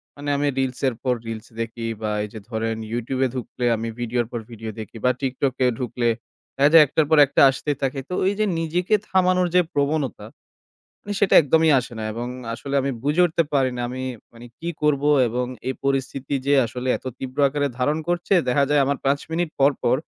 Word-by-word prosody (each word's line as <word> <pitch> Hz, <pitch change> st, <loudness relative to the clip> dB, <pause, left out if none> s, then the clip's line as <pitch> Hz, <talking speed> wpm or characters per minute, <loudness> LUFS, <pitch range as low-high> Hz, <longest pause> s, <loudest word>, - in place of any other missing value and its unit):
মানে, 145 Hz, 0 st, -5 dB
আমি 145 Hz, +1 st, 0 dB
reels-এর 130 Hz, -1 st, 0 dB
পর 125 Hz, -, +2 dB
reels 115 Hz, 0 st, -6 dB
দেখি। 115 Hz, 0 st, -5 dB, 0.2 s
বা 110 Hz, -1 st, -1 dB
এই 105 Hz, -, -6 dB
যে 110 Hz, -, -7 dB
ধরেন, 115 Hz, -1 st, -2 dB, 0.2 s
YouTube-এ 130 Hz, +3 st, 0 dB
ঢুকলে 125 Hz, 0 st, -4 dB
আমি 115 Hz, +1 st, -4 dB
video-র 120 Hz, 0 st, -1 dB
পর 120 Hz, -, -3 dB
video 110 Hz, -1 st, -7 dB
দেখি। 110 Hz, +1 st, -8 dB
বা 125 Hz, -, +5 dB
TikTok-এ 130 Hz, -1 st, 0 dB
ঢুকলে 120 Hz, -1 st, -1 dB, 0.5 s
দেখা 140 Hz, +1 st, +4 dB
যায়, 165 Hz, -2 st, +10 dB
একটার 150 Hz, +2 st, +1 dB
পর 160 Hz, -, +4 dB
একটা -, -, +2 dB
আসতেই 140 Hz, +2 st, -2 dB
থাকে। 135 Hz, +1 st, -1 dB
তো -, -, -4 dB
ওই 195 Hz, -, +3 dB
যে 215 Hz, -, +3 dB
নিজেকে 175 Hz, +5 st, +1 dB
থামানোর 185 Hz, -1 st, +2 dB
যে 180 Hz, -, +7 dB
প্রবণতা, 145 Hz, -3 st, -1 dB, 0.8 s
মানে, 205 Hz, -, -5 dB
সেটা 200 Hz, -, +3 dB
একদমই 160 Hz, +2 st, +3 dB
আসে 125 Hz, 0 st, -10 dB
না। 110 Hz, -, -4 dB
এবং 120 Hz, +2 st, -4 dB, 0.3 s
আসলে 140 Hz, +4 st, -6 dB
আমি 140 Hz, -, -1 dB
বুঝে 150 Hz, +6 st, +2 dB
উঠতে 165 Hz, 0 st, +1 dB
পারি 135 Hz, -2 st, +2 dB
না, 120 Hz, -, -3 dB
আমি, 130 Hz, +1 st, -5 dB, 0.3 s
মানে, 120 Hz, +1 st, -12 dB
কী 170 Hz, -, -5 dB
করব। 150 Hz, -2 st, +2 dB, 0.3 s
এবং 125 Hz, +2 st, -2 dB, 0.2 s
এই 130 Hz, -, -1 dB
পরিস্থিতি 135 Hz, 0 st, -1 dB
যে 140 Hz, -, +4 dB
আসলে 125 Hz, +2 st, -5 dB
এত -, -, -14 dB
তীব্র 130 Hz, +1 st, -7 dB
আকারে 145 Hz, +1 st, -1 dB
ধারণ 145 Hz, +5 st, +1 dB
করছে। 175 Hz, +2 st, +1 dB
দেখা 140 Hz, +3 st, +3 dB
যায়, 145 Hz, -1 st, +4 dB
আমার 140 Hz, 0 st, 0 dB
৫ 140 Hz, +1 st, +2 dB
মিনিট 170 Hz, 0 st, -1 dB
পর 140 Hz, +2 st, +5 dB
পর, 120 Hz, -, +3 dB
135 Hz, 200 wpm, -23 LUFS, 120-150 Hz, 0.8 s, যায়